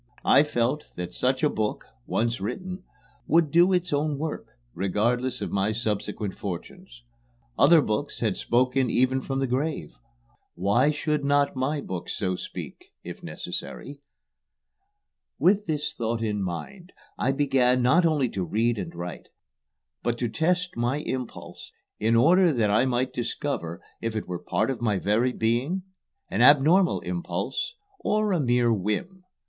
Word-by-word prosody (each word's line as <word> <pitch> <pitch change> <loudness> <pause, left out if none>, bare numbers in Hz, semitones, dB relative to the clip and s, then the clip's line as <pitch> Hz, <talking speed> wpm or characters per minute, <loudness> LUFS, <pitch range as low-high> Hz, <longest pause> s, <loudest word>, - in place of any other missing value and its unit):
I - - +7
felt 145 0 -1
that 90 0 -5
such 130 - 0
a - - +6
book, 110 -6 -2 0.2
once 115 -2 0
written, 185 - -5 0.4
would 160 -2 +3
do 175 +4 +5
its 180 -3 0
own 145 0 0
work, 155 +1 -4 0.3
regardless 115 - 0
of - - -4
my 100 +2 +1
subsequent 105 -2 -2
fortunes. 120 - -8 0.5
Other 165 -3 +6
books 110 +7 -2
had 110 -5 0
spoken 130 +1 +1
even 130 +3 +2
from 135 +1 -3
the 135 - +1
grave; 135 +5 -2 0.6
why 105 +10 +3
should 150 0 -1
not 140 0 +2
my 140 +3 -1
book 90 -7 -6
so 95 -3 -1
speak - - -8 0.2
if - - -8
necessary? 140 0 -6 1.4
With 200 +2 +3
this 150 -2 -1
thought 115 0 -2
in 105 -2 -1
mind 175 - -6 0.3
I 130 - +2
began 130 -3 +2
not 160 +9 +4
only 155 -6 +2
to 95 -3 -3
read 110 +6 0
and - - -6
write, 85 0 -7 0.7
but 120 0 -1
to 120 -1 -1
test 180 +7 0
my 120 +4 0
impulse 130 -5 -6 0.3
in 115 +2 +2
order 175 +9 +5
that 115 -7 +1
I 110 +5 +4
might 130 0 0
discover 115 - -3 0.2
if 115 -1 -3
it 110 - -3
were 90 - -3
a - - -25
part 110 +7 0
of 125 - -5
my 105 -4 +1
very 110 +6 +1
being, 125 +11 0 0.4
an 110 - -1
abnormal 150 +8 +5
impulse, 175 - -3 0.2
or 215 - +1
a 180 - +2
mere 120 -3 +3
whim. 115 - -3
130 Hz, 155 wpm, -26 LUFS, 110-150 Hz, 1.4 s, I